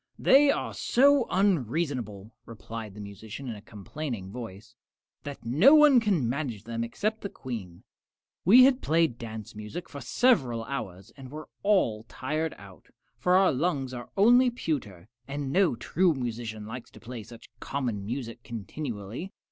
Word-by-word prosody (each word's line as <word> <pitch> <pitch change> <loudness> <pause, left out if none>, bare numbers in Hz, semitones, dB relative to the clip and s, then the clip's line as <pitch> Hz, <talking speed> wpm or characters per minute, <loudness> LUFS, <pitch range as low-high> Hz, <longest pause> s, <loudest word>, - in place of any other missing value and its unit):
"They 280 +2 +6
are - - 0
so 280 0 +4
unreasonable," 135 - 0 0.2
replied 110 -2 -8
the - - -10
musician, 105 +5 -8
in 115 - -4
a 105 - -11
complaining 105 -1 -6
voice, 110 -3 -9 0.5
"that 140 -4 -8
no 170 - +6
one 300 -4 +7
can 195 - +1
manage 125 -5 -3
them 115 0 -3
except 215 - -2
the 200 - -4
Queen. 110 - -7 0.6
We 235 +8 +8
had 265 0 +4
played 160 -7 +1
dance 110 -3 -7
music 105 +12 -7
for 140 - -9
several 130 - +2
hours 100 -6 -6
and 135 -2 -11
were 155 +3 -9
all 190 - +2
tired 155 +4 -3
out, 95 -6 -15 0.3
for 180 0 +3
our 190 0 +5
lungs 135 -3 -1
are 120 -1 -7
only 245 +5 +6
pewter, 125 - -4 0.2
and 140 -1 -4
no 185 -5 +3
true 175 +6 +1
musician 115 -4 -4
likes 115 +3 -8
to - - -15
play 120 0 -8
such 115 +2 -14
common 120 -8 -3
music 115 +1 -5
continually. 120 - -6
130 Hz, 155 wpm, -28 LUFS, 110-175 Hz, 0.6 s, We